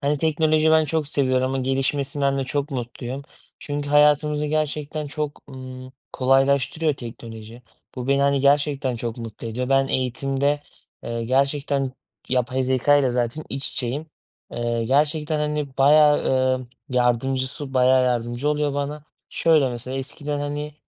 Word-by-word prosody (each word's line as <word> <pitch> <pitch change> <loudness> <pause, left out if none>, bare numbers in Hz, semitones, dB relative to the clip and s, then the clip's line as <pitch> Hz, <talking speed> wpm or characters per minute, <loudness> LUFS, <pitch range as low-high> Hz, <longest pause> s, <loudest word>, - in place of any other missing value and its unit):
Hani, 145 +1 0
teknoloji 155 0 +2
ben 160 0 +5
çok 155 -1 -1
seviyorum 130 -3 +1
ama 135 +1 -2
gelişmesinden 135 +1 0
de 135 - -1
çok 145 +2 -2
mutluyum 125 +1 -5 0.4
çünkü 145 0 -4
hayatımızı 150 +1 +3
gerçekten 150 0 -2
çok, 150 0 -4
ımm, 130 -1 -9 0.2
kolaylaştırıyor 135 +4 +2
teknoloji. 115 -1 -10 0.3
Bu 125 0 -5
beni, 140 0 +3
hani, 140 0 +2
gerçekten 140 -2 +2
çok 115 0 -4
mutlu 115 -1 -7
ediyor. 125 +3 -3
Ben 135 0 +3
eğitimde, 135 +3 0 0.4
eee, 115 0 -3
gerçekten 135 +1 0 0.4
yapay 130 +1 0
zekâyla 130 +1 +3
zaten 120 +5 -2
iç 135 0 -4
içeyim, 135 +6 -3 0.5
eee, 120 -1 -1
gerçekten, 150 +4 +1
hani, 150 -2 -2
bayağı, 150 +2 +5 0.3
eee, 130 - -9 0.3
yardımcısı 130 +3 0
bayağı 130 0 +4
yardımcı 120 +2 -1
oluyor 150 -1 0
bana. 145 +1 -3 0.3
Şöyle 155 -5 +3
mesela 125 +2 -5
eskiden 145 +2 -4
hani, 145 +1 -4
135 Hz, 135 wpm, -23 LUFS, 130-150 Hz, 0.5 s, ben